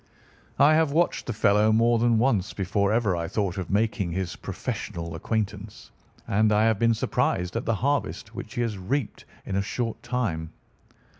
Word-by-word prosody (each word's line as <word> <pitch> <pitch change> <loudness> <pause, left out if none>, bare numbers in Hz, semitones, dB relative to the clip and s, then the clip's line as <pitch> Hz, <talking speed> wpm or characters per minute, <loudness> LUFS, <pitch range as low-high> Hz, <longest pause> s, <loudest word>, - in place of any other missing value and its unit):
I 145 +2 +6
have 160 -2 +3
watched 170 +2 +1
the - - -1
fellow 105 +1 +3
more 115 +1 +3
than 115 -1 +3
once 110 -5 +1
before 100 +1 0
ever 110 -5 +2
I 85 -1 -3
thought 95 0 -2
of 90 - -5
making 105 -3 0
his 95 -1 -3
professional 85 0 -5
acquaintance, 105 +3 -4 0.4
and 105 +2 +3
I 105 +1 +4
have 110 -2 +2
been 115 -1 +3
surprised 90 -3 -1
at 115 - -2
the 115 - +1
harvest 125 -2 -1
which 110 - -8
he 120 - 0
has 110 -4 -2
reaped 125 +6 -3 0.2
in 95 - -3
a - - +2
short 115 +3 -3
time. 85 -11 -2
110 Hz, 175 wpm, -26 LUFS, 95-115 Hz, 0.4 s, I